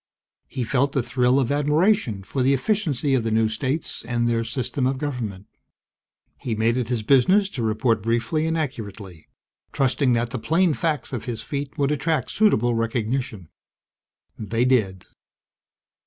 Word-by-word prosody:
He 130 Hz, -, -4 dB
felt 140 Hz, +4 st, 0 dB
a 135 Hz, -, +2 dB
thrill 125 Hz, +2 st, +2 dB
of 130 Hz, -1 st, 0 dB
admiration 150 Hz, -, +1 dB
for 130 Hz, +7 st, -3 dB
the 135 Hz, +2 st, +3 dB
efficiency 145 Hz, -, 0 dB
of 130 Hz, -3 st, +2 dB
the 115 Hz, -, -1 dB
new 110 Hz, 0 st, +2 dB
states 130 Hz, +8 st, -3 dB
and 120 Hz, 0 st, -1 dB
their 115 Hz, -1 st, +1 dB
system 130 Hz, +2 st, -1 dB
of 135 Hz, 0 st, -1 dB
government. 120 Hz, -9 st, -4 dB, 0.9 s
He 115 Hz, -, -3 dB
made 115 Hz, +2 st, +1 dB
it 125 Hz, -3 st, -1 dB
his 120 Hz, -3 st, -2 dB
business 185 Hz, -, +4 dB
to 130 Hz, -, -5 dB
report 110 Hz, 0 st, +1 dB
briefly 120 Hz, +9 st, 0 dB
and 160 Hz, 0 st, 0 dB
accurately, 105 Hz, -, -6 dB, 0.4 s
trusting 130 Hz, -1 st, +1 dB
that 120 Hz, 0 st, 0 dB
the -, -, -3 dB
plain 165 Hz, +5 st, +2 dB
facts 150 Hz, -5 st, -2 dB
of 120 Hz, -, -4 dB
his 120 Hz, -3 st, -4 dB
feat 140 Hz, -1 st, -5 dB
would 140 Hz, 0 st, +1 dB
attract 150 Hz, -2 st, -1 dB
suitable 120 Hz, -, +3 dB
recognition. 115 Hz, -, -2 dB, 0.9 s
They 115 Hz, +3 st, 0 dB
did. 105 Hz, -8 st, +1 dB
125 Hz, 155 wpm, -23 LUFS, 115-140 Hz, 0.9 s, business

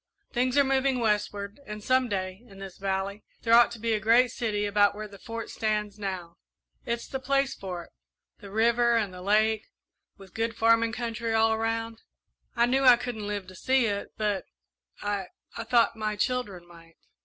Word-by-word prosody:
Things 250 Hz, +2 st, +1 dB
are 280 Hz, -, +7 dB
moving 265 Hz, -1 st, +1 dB
westward, 210 Hz, -1 st, -1 dB
and 210 Hz, 0 st, -7 dB
some 255 Hz, 0 st, +2 dB
day, 185 Hz, 0 st, -3 dB
in 195 Hz, -3 st, -15 dB
this 195 Hz, -2 st, -9 dB
valley, 195 Hz, +1 st, -2 dB, 0.2 s
there 230 Hz, -, +2 dB
ought 240 Hz, +1 st, +8 dB
to 235 Hz, -, -8 dB
be 230 Hz, 0 st, 0 dB
a 215 Hz, -, +1 dB
great 230 Hz, +3 st, +4 dB
city 210 Hz, -3 st, -1 dB
about 205 Hz, 0 st, +3 dB
where 215 Hz, 0 st, -6 dB
the 200 Hz, -1 st, -14 dB
Fort 230 Hz, 0 st, -6 dB
stands 210 Hz, -1 st, -2 dB
now. 185 Hz, -4 st, -5 dB, 0.5 s
It's 235 Hz, 0 st, -2 dB
the 265 Hz, -, -4 dB
place 275 Hz, +1 st, +1 dB
for 180 Hz, -3 st, -6 dB
it -, -, -19 dB, 0.5 s
the 200 Hz, -, -11 dB
river 235 Hz, +3 st, +3 dB
and 205 Hz, -4 st, -1 dB
the 180 Hz, -, -9 dB
lake, 215 Hz, +2 st, +2 dB, 0.5 s
with 195 Hz, -2 st, -15 dB
good 230 Hz, 0 st, -2 dB
farming 230 Hz, 0 st, +3 dB
country 230 Hz, -1 st, -2 dB
all 225 Hz, 0 st, +4 dB
around. 225 Hz, 0 st, -2 dB, 0.5 s
I 235 Hz, -, +4 dB
knew 265 Hz, +3 st, +1 dB
I 250 Hz, -2 st, +8 dB
couldn't 235 Hz, -4 st, -5 dB
live 205 Hz, -2 st, -3 dB
to 185 Hz, 0 st, -13 dB
see 260 Hz, +6 st, +2 dB
it, 200 Hz, -2 st, -3 dB
but 210 Hz, -3 st, -1 dB, 0.6 s
I 205 Hz, -2 st, -2 dB, 0.3 s
I 230 Hz, -, -4 dB
thought 235 Hz, -1 st, +3 dB
my 215 Hz, -1 st, -2 dB
children 205 Hz, -6 st, -2 dB
might." 165 Hz, -1 st, -17 dB
220 Hz, 190 wpm, -27 LUFS, 200-235 Hz, 0.6 s, ought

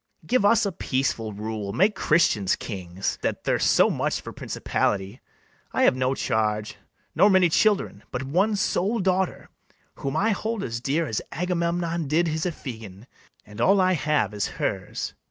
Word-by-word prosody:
Give 250 Hz, -4 st, +2 dB
us 205 Hz, +1 st, +4 dB
a 200 Hz, -, -1 dB
peaceful 130 Hz, -8 st, -1 dB
rule; 105 Hz, -1 st, -5 dB
make 200 Hz, +4 st, +3 dB
Christians 150 Hz, -, +2 dB
kings, 95 Hz, -2 st, -4 dB
That -, -, -2 dB
thirst -, -, +1 dB
so -, -, +5 dB
much -, -, -1 dB
for -, -, -9 dB
principality. 95 Hz, -1 st, -2 dB, 0.5 s
I -, -, +2 dB
have -, -, +5 dB
no 130 Hz, +1 st, 0 dB
charge, 105 Hz, -4 st, -1 dB, 0.4 s
nor 195 Hz, +5 st, +5 dB
many 190 Hz, -3 st, +5 dB
children, 195 Hz, -, +2 dB
But 125 Hz, -, -4 dB
one 185 Hz, +10 st, +1 dB
sole 200 Hz, +2 st, 0 dB
daughter, 190 Hz, -2 st, 0 dB, 0.5 s
whom 140 Hz, +2 st, -3 dB
I 220 Hz, +5 st, +2 dB
hold 220 Hz, +1 st, -2 dB
as 115 Hz, 0 st, -4 dB
dear 145 Hz, +6 st, 0 dB
As 110 Hz, -8 st, -2 dB
Agamemnon 170 Hz, -1 st, -1 dB
did 165 Hz, +4 st, +2 dB
his 160 Hz, +2 st, -1 dB
Iphigen; 110 Hz, -, -8 dB, 0.4 s
And 105 Hz, +2 st, -8 dB
all 195 Hz, +8 st, +4 dB
I 185 Hz, 0 st, +3 dB
have 150 Hz, -, 0 dB
is 105 Hz, -, -1 dB
hers. -, -, -3 dB
155 Hz, 160 wpm, -25 LUFS, -, 0.5 s, so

